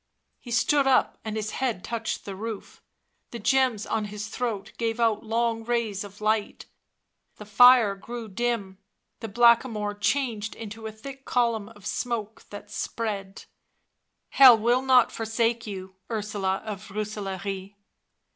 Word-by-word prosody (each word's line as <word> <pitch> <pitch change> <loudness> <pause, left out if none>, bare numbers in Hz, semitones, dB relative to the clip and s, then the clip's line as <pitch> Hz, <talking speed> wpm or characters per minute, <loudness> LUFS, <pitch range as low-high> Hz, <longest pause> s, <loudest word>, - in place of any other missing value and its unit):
He 245 - -12
stood 275 +4 +2
up, 265 - +2
and 220 -2 -4
his 215 0 -3
head 235 -8 -2
touched 230 -1 -4
the 195 - -6
roof; 220 +1 -7 0.5
the 235 - -7
gems 230 0 +2
on 220 -1 -1
his 210 +1 -6
throat 230 -5 -4
gave 230 0 -1
out 225 -3 +2
long 225 0 0
rays 225 -4 -1
of 205 0 -12
light... 215 0 -1 0.7
the 210 - -11
fire 235 0 +7
grew 230 +3 -8
dim; 205 -2 -2 0.4
the 225 - -5
Blackamoor 230 -1 +3
changed 215 0 -1
into 225 0 -7
a - - -6
thick 270 +5 -10
column 230 -5 0
of 205 -3 -16
smoke... 225 -2 -3
that 205 - -10
spread.... 200 -4 -4 0.4
" - - -53
Hell 255 -4 +10
will 240 +3 +2
not 260 -2 +4
forsake 230 +1 -1
you, 190 -2 -7 0.2
Ursula 205 -3 -2
of 210 -2 -6
Rooselaare." 195 -1 -5
220 Hz, 145 wpm, -26 LUFS, 205-235 Hz, 0.7 s, Hell